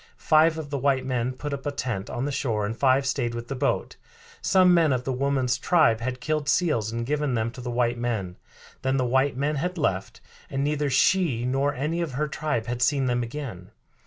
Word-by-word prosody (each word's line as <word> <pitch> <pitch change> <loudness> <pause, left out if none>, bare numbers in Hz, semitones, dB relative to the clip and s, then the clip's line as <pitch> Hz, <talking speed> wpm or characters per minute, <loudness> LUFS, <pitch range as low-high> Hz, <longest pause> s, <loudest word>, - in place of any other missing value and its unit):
Five 155 +1 +4
of 150 -3 -6
the 140 - -1
white 135 -1 +1
men 125 -1 -1
put 145 +3 -5
up 135 -1 -5
a - - 0
tent 125 -8 -3
on 120 - -3
the 145 - -2
shore 115 -6 -1
and 110 +2 -3
five 135 +2 +3
stayed 120 -3 -1
with 120 0 -6
the 135 - -3
boat. 125 - -1 0.4
Some 185 -1 +5
men 165 -4 +4
of 125 -1 0
the 135 - -2
woman's 130 -1 0
tribe 155 -11 +3
had 130 +1 -3
killed 150 +2 -1
seals 135 - +1
and 115 0 -3
given 145 -1 0
them 115 0 -1
to 125 - -10
the 125 - -5
white 120 0 0
men; 110 -7 -3 0.4
then 130 +1 +1
the 130 - +1
white 130 +2 +1
men 145 +2 0
had 180 +5 -2
left, 95 - -1 0.3
and 135 0 -1
neither 150 0 0
she 135 -3 +2
nor 135 +3 0
any 155 +6 -1
of 160 -6 -3
her 150 +4 -1
tribe 145 -6 -2
had 120 0 -4
seen 135 +1 +2
them 120 -1 +1
again. 115 -7 -6
130 Hz, 220 wpm, -25 LUFS, 120-145 Hz, 0.4 s, Some